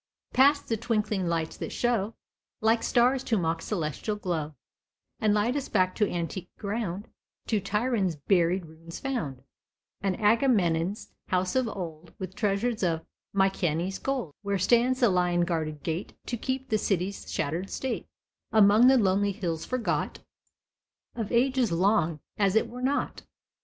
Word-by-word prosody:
Past 285 +3 +4
the 225 - 0
twinkling 210 -4 0
lights 165 -1 -1
that - - -5
show, 230 -3 0 0.4
Like 225 +1 +3
stars 250 +2 +3
to 225 - +1
mock 165 -2 0
celestial 175 +3 -2
glow, 160 -7 -3 0.6
And 215 - +3
light 210 +5 +2
us 285 - -3
back 185 -3 +2
to 210 -2 +2
antique 175 +1 -4
ground— 205 -2 -3 0.4
To 215 -3 0
Tiryn's 210 -3 0
buried 175 +3 +2
ruins 165 +1 -10
found, 150 - -3 0.6
And 195 0 -1
Agamemnon's 205 -5 +2
house 185 +2 0
of 255 -2 +2
old, 170 -5 -7
With 185 -1 -6
treasures 215 +3 0
of 165 -3 0 0.3
Mykenæ's 190 -2 +1
gold, 255 - -2
Where 200 -1 -1
stands 240 +7 +3
the 240 - +6
lion 180 -1 +2
guarded 160 -4 -2
gate, 165 +3 -3
To 240 - -2
keep 260 +3 -3
the 215 - +2
city's 195 -1 -2
shattered 170 +7 -2
state, 260 -3 -3 0.4
Among 215 +2 +6
the 265 0 +7
lonely 200 -1 +2
hills 170 -6 -3
forgot 255 -2 -1 1.0
Of 225 -4 -4
ages 250 -1 +2
long, 170 -3 +2 0.2
as 200 -1 +3
it 220 - +3
were 250 +1 -8
not. 275 +3 -1
200 Hz, 145 wpm, -28 LUFS, 175-230 Hz, 1.0 s, the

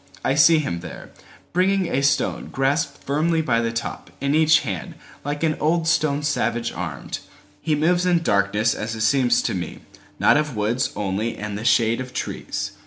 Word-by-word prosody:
I 130 - +2
see 155 +3 +6
him 110 - -2
there, 85 -2 -10 0.4
Bringing 190 +2 +2
a 140 -5 0
stone 140 0 0
grasped 140 +2 -1
firmly 160 +3 +1
by 115 -6 +1
the 115 -1 -1
topIn 140 +4 -4
each 160 0 +5
hand, 95 - -5 0.3
like 145 +2 -3
an 155 -1 +2
old 160 +2 +1
stone 155 -4 +1
savage 120 -5 0
armed. 85 -6 -5 0.4
He 155 - +1
moves 175 +4 +2
in 170 -2 +2
darkness 105 0 +2
as 115 +2 -4
it 110 - -5
seems 120 +1 +3
to - - -1
me, 90 -3 -5 0.4
Not - - +4
of 150 -4 -1
woods 110 +4 0
only 105 +3 -2
and 105 -1 -5
the 105 - -5
shade 115 +1 +3
of 130 0 -8
trees. - - -4
135 Hz, 175 wpm, -22 LUFS, 110-155 Hz, 0.4 s, see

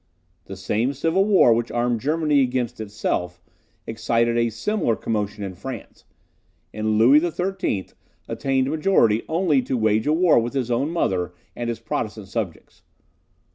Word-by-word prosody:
The 95 - -8
same 110 +7 -1
civil 165 +7 +1
war 190 - +5
which 115 +1 -1
armed 120 -1 0
Germany 150 0 +2
against 125 -3 -1
itself, 90 -4 -3 0.5
excited 115 +1 0
a 115 0 +2
similar 120 - -1
commotion 105 -2 -3
in 95 -1 -5
France; 90 - -9 0.7
and 110 0 0
Louis 125 +7 +6
XIII. 175 - -2 0.4
attained 135 0 0
majority 150 - +3
only 160 -4 +2
to 130 0 -2
wage 110 +1 +1
a 150 - +3
war 165 -4 +4
with 120 +2 -3
his 130 -3 -2
own 130 +5 0
mother 90 - -1 0.2
and 120 0 -3
his 115 -1 -3
Protestant 110 -3 -4
subjects. 100 -7 -5
120 Hz, 145 wpm, -23 LUFS, 110-150 Hz, 0.7 s, Louis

